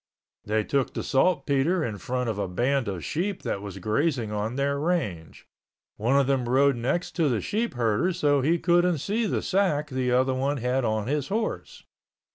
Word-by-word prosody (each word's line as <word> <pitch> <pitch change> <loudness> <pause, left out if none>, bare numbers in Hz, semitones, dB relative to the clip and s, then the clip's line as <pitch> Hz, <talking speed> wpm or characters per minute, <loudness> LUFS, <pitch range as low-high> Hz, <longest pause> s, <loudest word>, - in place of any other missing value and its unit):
They 110 +1 0
took 135 +3 -1
the - - -2
saltpeter 145 +3 +2
in 105 -4 -5
front 125 +5 -2
of 110 -3 -2
a 100 - -1
band 120 +7 0
of 95 -4 -4
sheep 190 +4 -2
that 100 - -2
was 100 -2 -7
grazing 115 - 0
on 105 +3 -2
their 140 +1 0
range. 145 - -2 0.5
One 125 +6 +2
of 140 - +3
them 130 -3 0
rode 135 +2 +4
next 130 +9 -1
to 160 -4 +3
the 120 -4 +1
sheepherder 175 - 0
so 145 -4 +2
he 160 +6 +2
couldn't 175 0 +2
see 215 - -1
the - - -1
sack 155 -7 0
the 130 -1 0
other 130 +1 +2
one 135 +3 -1
had 125 +2 0
on 110 -2 0
his 140 +2 -1
horse. 220 +5 -3
135 Hz, 185 wpm, -26 LUFS, 115-160 Hz, 0.5 s, rode